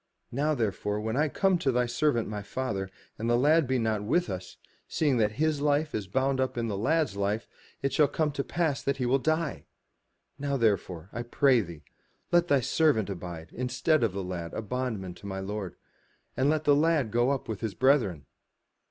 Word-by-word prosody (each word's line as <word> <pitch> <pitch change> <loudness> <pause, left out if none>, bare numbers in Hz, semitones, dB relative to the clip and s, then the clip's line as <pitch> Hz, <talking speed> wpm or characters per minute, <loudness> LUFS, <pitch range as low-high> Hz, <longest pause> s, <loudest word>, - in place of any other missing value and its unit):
Now 150 +5 +1
therefore 105 -3 -1
when 110 +2 -2
I 150 +3 +3
come 190 +3 +2
to 135 - +1
thy 125 0 +2
servant 120 -1 +1
my 105 -1 -4
father, 100 -4 -3 0.3
and 115 +2 -1
the 120 - +4
lad 150 +3 +4
be 130 0 +1
not 110 -3 0
with 125 - +1
us, 90 -1 -7 0.3
seeing 145 -5 +1
that 105 -2 +2
his 150 +2 0
life 150 +1 +1
is 105 -3 -3
bound 130 +6 0
up 130 -2 -1
in 115 -1 -1
the 105 - -2
lad*s 150 +4 +1
life, 100 +2 -1 0.4
it 140 -1 0
shall 150 +1 +5
come 155 0 0
to 140 -1 -2
pass 160 -3 -1
that 140 0 -1
he 125 - -1
will 130 +3 +3
die. 155 +1 -1 0.7
Now 140 0 -1
therefore, 100 -6 0
I 120 - -3
pray 125 +1 +3
thee, 85 -6 -9 0.5
let 175 0 +4
thy 140 -5 +3
servant 115 - +2
abide 85 -3 -7
instead 135 +5 +1
of 110 -5 +1
the 100 0 -3
lad 85 -2 -5
a 110 - -3
bondman 110 -5 -3
to 100 - -10
my 95 -1 -4
lord; 100 -1 -5 0.6
and 135 +2 +2
let 155 0 +1
the 145 -2 +5
lad 150 -6 +2
go 120 +3 +2
up 140 -2 -1
with 110 -3 -4
his 110 -5 -3
brethren. 125 - +2
125 Hz, 205 wpm, -28 LUFS, 105-145 Hz, 0.7 s, shall